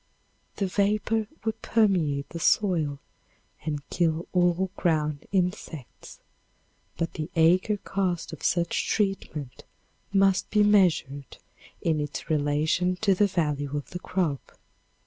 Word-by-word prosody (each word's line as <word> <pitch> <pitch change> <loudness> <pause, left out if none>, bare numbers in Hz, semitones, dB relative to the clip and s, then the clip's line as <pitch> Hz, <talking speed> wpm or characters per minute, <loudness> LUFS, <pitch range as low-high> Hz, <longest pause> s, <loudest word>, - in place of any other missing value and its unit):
The 200 - -1
vapor 210 +3 +1 0.2
would 220 - -2
permeate 175 -11 +1
the 170 - -6
soil 165 -7 +2 0.7
and 150 -2 -4
kill 165 -1 0
all 180 +1 +2
ground 150 -4 0
insects, 180 - -3 0.8
but 165 - -2
the 155 +1 -4
acre 180 +6 +4
cost 185 -5 -2
of 160 - -9
such 170 -1 0
treatment 195 - -2 0.5
must 195 -1 +3
be 210 -1 +4
measured 175 -9 +2 0.4
in 160 -2 +1
its 150 +2 -4
relation 155 +4 +1
to 200 -3 +4
the 205 +2 +3
value 150 -6 -1
of 145 - -7
the 180 - -5
crop. 170 -7 -2
175 Hz, 120 wpm, -26 LUFS, 150-195 Hz, 0.8 s, acre